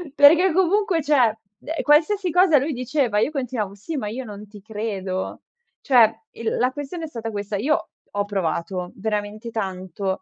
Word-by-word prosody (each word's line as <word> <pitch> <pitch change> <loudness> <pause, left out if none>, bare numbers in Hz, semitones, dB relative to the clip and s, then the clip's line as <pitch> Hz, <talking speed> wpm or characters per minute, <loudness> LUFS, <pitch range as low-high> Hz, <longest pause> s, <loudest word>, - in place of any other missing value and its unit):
perché 325 +5 +7
comunque, 375 -2 +2
cioè, 255 -7 +3 0.2
uhm, 320 +1 -4
qualsiasi 345 +5 +3
cosa 355 -3 +5
lui 285 +4 0
diceva, 255 -3 0
io 280 - +1
continuavo: 245 -8 -3
"Sì, 295 +10 -5
ma 215 -6 -3
io 250 +5 -4
non 210 -2 -9
ti 205 0 -13
credo". 200 -3 -4 0.4
Cioè, 240 -6 +6 0.2
il 230 -1 -3
la 255 +2 +2
questione 290 +4 -6
è - - -3
stata 230 -5 -5
questa, 205 -1 -3
io 285 +8 0 0.3
ho 205 - +1
provato 180 -2 -2
veramente 210 +2 -3
tanto 190 -2 -3
230 Hz, 165 wpm, -23 LUFS, 205-300 Hz, 0.4 s, perché